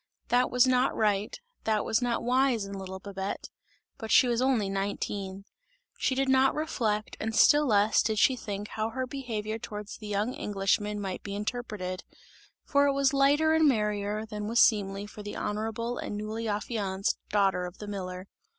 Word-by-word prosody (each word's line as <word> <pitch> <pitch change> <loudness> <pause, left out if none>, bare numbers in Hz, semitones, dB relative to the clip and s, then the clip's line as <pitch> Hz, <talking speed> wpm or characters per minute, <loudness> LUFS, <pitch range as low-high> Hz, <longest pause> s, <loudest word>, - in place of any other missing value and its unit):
That 245 +1 +3
was 250 0 +4
not 255 0 +2
right, 210 - 0 0.3
that 215 -1 +1
was 220 - +1
not 240 -1 0
wise 250 -3 +2
in 200 - -7
little 190 -1 -6
Babette; 195 0 -5 0.5
but 220 -3 -6
she 250 - +6
was 240 0 +1
only 255 -6 +2
nineteen! 195 0 -3 0.5
She 260 - 0
did 270 +1 +1
not 265 0 +4
reflect 220 -9 -1
and 220 0 -3
still 295 +4 +6
less 210 -1 +4
did 215 0 -1
she 265 +3 +4
think 205 -3 -5
how 220 0 -2
her 260 +3 -3
behaviour 225 -5 -4
towards 210 -1 -7
the 215 - -9
young 210 +4 -1
Englishman 205 +1 -1
might 190 -2 -4
be 200 -1 -6
interpreted; 210 -4 -4 0.6
for 285 0 +3
it 280 - +2
was 275 0 +2
lighter 290 +3 +4
and 320 -1 +5
merrier 210 -2 -1
than 210 -1 -5
was 230 +2 +1
seemly 200 -2 +3
for 210 0 -10
the 205 0 -6
honourable 225 +3 -3
and 205 - -4
newly 220 +2 -4
affianced 205 -2 -1
daughter 195 -3 +2
of 180 - -11
the 210 - -8
miller. 185 -2 -6
215 Hz, 180 wpm, -28 LUFS, 200-245 Hz, 0.6 s, she